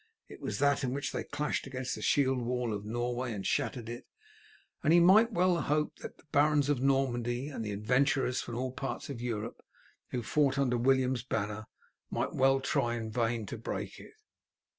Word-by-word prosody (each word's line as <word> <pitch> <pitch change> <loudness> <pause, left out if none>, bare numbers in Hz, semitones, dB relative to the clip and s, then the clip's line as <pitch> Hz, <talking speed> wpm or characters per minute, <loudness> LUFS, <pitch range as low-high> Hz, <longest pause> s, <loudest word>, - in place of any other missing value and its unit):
It - - -12
was 105 - -3
that 140 0 +2
in 125 -1 -1
which 140 0 -2
they - - -3
clashed 150 -2 -2
against 130 -1 -4
the - - -6
shield 135 -3 +2
wall 120 -1 -1
of 105 0 -5
Norway 120 +2 -2
and 100 -2 -5
shattered 130 -5 -1
it, 120 +1 -7 0.8
and - - +3
he 175 - +7
might 210 +7 +6
well 180 -3 +2
hope 150 +2 0
that - - -8
the - - -21
barons 145 0 +3
of 140 -4 +1
Normandy 130 -1 +1
and 130 -6 -5
the 105 - -3
adventurers 125 +5 +1
from 120 - -6
all 130 +1 -2
parts 135 +1 -5
of 120 -4 -6
Europe 115 -2 -4 0.5
who 125 -2 -3
fought 140 +4 +2
under 130 -3 +2
William's 130 0 +2
banner 110 -3 -3 0.4
might - - -2
well 135 +1 +4
try 120 -3 0
in 110 -2 -4
vain 115 -1 0
to 115 +3 -6
break 115 - -5
it. 425 - -14
130 Hz, 190 wpm, -31 LUFS, 120-140 Hz, 0.8 s, he